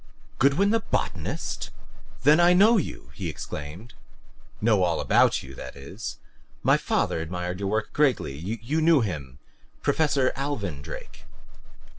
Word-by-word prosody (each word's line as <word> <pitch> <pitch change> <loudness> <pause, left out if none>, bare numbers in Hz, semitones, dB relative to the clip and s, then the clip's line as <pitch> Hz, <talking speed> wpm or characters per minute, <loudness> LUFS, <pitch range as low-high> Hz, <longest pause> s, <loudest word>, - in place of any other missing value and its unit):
"Goodwin 150 +10 +4
the 230 - +3
botanist? - - -3 0.5
Then 150 +4 +6
I 175 +1 +6
know 215 +6 +6
you!" 60 - -4
he 85 +3 -4
exclaimed. 75 +8 -7 0.7
"Know 105 -3 +3
all 90 -2 +1
about - - +3
you, 65 0 -10
that 65 0 -8
is. 105 +10 -7 0.5
My - - +5
father - - 0
admired 90 +2 -4
your 100 -1 -2
work 110 +1 -1
greatly. 140 - +2
You 115 - -3
knew 160 -3 +5
him 75 - -4 0.5
Professor 145 -4 +2
Alvin 105 - -3
Drake." - - -9
105 Hz, 135 wpm, -26 LUFS, -, 0.7 s, Then